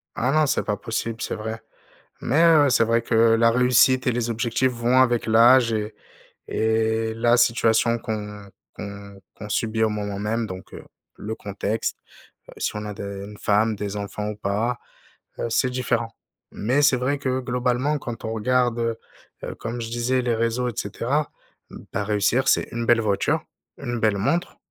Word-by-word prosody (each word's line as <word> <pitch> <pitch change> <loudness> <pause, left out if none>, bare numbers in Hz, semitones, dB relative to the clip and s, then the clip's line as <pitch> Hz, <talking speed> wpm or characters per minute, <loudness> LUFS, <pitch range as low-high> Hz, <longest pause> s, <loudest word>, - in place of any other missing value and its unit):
Ah 125 +3 0
non, 155 +1 +3
c'est 140 - +1
pas 105 -1 -2
possible, 115 0 -4
c'est - - -3
vrai 110 +1 -5 0.6
mais 145 +7 +2
heu, 160 -4 +6
c'est 125 - +3
vrai 115 +1 +2
que 115 - -3 0.2
la 115 0 +4
réussite 125 +1 +4
et - - +2
les 120 0 -1
objectifs 120 +2 0
vont 120 +2 +2
avec 120 -2 +2
l'âge 115 +2 +5
et 105 0 -3 0.5
et 110 0 0
la 120 +1 +3
situation 115 -1 +3
qu'on 105 -3 -6 0.3
qu'on 100 -1 -9
qu'on 105 - -9
subit 110 +1 0
au 110 - +3
moment 105 -2 -4
même 110 +3 -1
donc 95 -2 -9
heu, - - -10 0.3
le 110 +2 -5
contexte, 105 +1 -3 0.5
heu, - - -11
si - - -2
on 105 0 -4
a 105 - -5
des - - -9 0.2
une 105 +1 -11
femme, 105 +1 +2
des 105 0 -5
enfants 105 +1 -4
ou 105 - -5
pas, 105 +4 -1 0.6
heu, - - -1
c'est 130 +3 +2
différent, 125 -2 -1 0.4
mais 130 +7 0
c'est 140 -3 +4
vrai 135 +3 -1
que 130 -2 -1
globalement, 125 +3 0
quand 120 -3 -7
on 110 - -3
regarde, 120 +1 +1
heu, 115 -1 -1 0.5
heu, - - -4
comme 115 +1 -5
je 115 - -5
disais, 125 +2 0
les 120 -1 +1
réseaux 115 +2 0
et - - -6
cetera. 130 +10 -2 0.4
Mmh, - - -11
bah, 105 - -1
réussir 105 +6 +1
c'est - - +3
une 120 0 -3
belle 120 -1 +4
voiture, 100 -3 0 0.3
une 120 -1 -4
belle 110 -3 +2
montre, 165 - -1
115 Hz, 185 wpm, -23 LUFS, 105-125 Hz, 0.6 s, heu